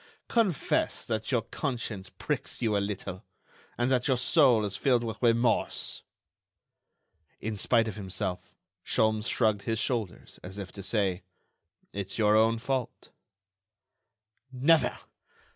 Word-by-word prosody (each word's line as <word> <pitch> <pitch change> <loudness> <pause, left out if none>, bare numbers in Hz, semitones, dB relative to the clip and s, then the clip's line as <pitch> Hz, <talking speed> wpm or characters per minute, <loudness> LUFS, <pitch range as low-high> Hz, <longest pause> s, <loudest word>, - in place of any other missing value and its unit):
Confess 215 - +1
that 110 +1 -2
your 120 -4 +2
conscience 115 -8 -4
pricks - - -3
you 110 -3 +1
a - - +3
little, 100 -2 -4 0.5
and 120 +2 +1
that 125 0 +2
your 130 -3 +3
soul 125 -4 +4
is 100 -1 -3
filled 125 +1 +2
with 110 -1 -5
remorse." 115 0 +1 1.4
In 110 0 -3
spite 115 +3 +2
of 105 -2 -5
himself, 95 -2 -4 0.3
Sholmes 110 0 +1
shrugged 110 -4 +2
his 115 +1 -1
shoulders, 110 -5 -3
as 95 +2 -9
if 100 -2 -6
to 100 - -8
say: 95 -2 0 0.7
"It's 100 -1 -5
your 105 -1 +4
own 110 +1 +4
fault." 125 +1 -3 1.4
"Never! 145 +5 +3
110 Hz, 125 wpm, -29 LUFS, 100-125 Hz, 1.4 s, soul